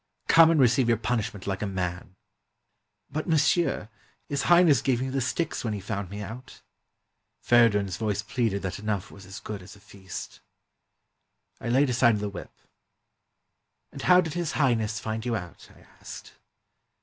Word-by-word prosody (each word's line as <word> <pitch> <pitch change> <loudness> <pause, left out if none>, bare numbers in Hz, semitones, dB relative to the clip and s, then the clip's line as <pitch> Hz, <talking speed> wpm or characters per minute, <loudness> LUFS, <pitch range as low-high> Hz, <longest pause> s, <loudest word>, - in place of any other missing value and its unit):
"Come 165 -1 +7
and 165 -2 +3
receive 125 -1 +4
your 115 -1 +3
punishment 110 -4 -3
like 95 -1 -3
a 105 - -1
man." 90 -1 -4 1.0
"But, 155 +4 -3
monsieur, 160 -5 +2 0.4
His 140 -1 -1
Highness 170 -7 +6
gave 130 -3 +1
me 130 +1 -2
the 135 0 -1
sticks 160 +6 -2
when 110 -3 -2
he 105 - -4
found 100 -1 -4
me 100 +2 -6
out." 125 +5 -10 0.8
Feridun's 105 -6 +3
voice 105 -3 -2
pleaded 110 -6 -1
that 95 0 -4
enough 105 -3 -3
was 100 -1 -13
as 95 - -8
good 105 -3 -7
as 95 +2 -13
a - - -17
feast. 100 -2 -9 1.2
I - - -5
laid 130 +2 +3
aside 120 -2 +4
the 105 0 -3
whip. 100 -3 -9 1.4
"And - - -8
how 180 0 +6
did 160 -4 -5
His 175 -2 -2
Highness 110 -6 +1
find 110 0 -4
you 120 -1 -1
out?" 90 -5 -8
I - - -19 0.2
asked. - - -10
110 Hz, 165 wpm, -26 LUFS, 100-135 Hz, 1.4 s, Come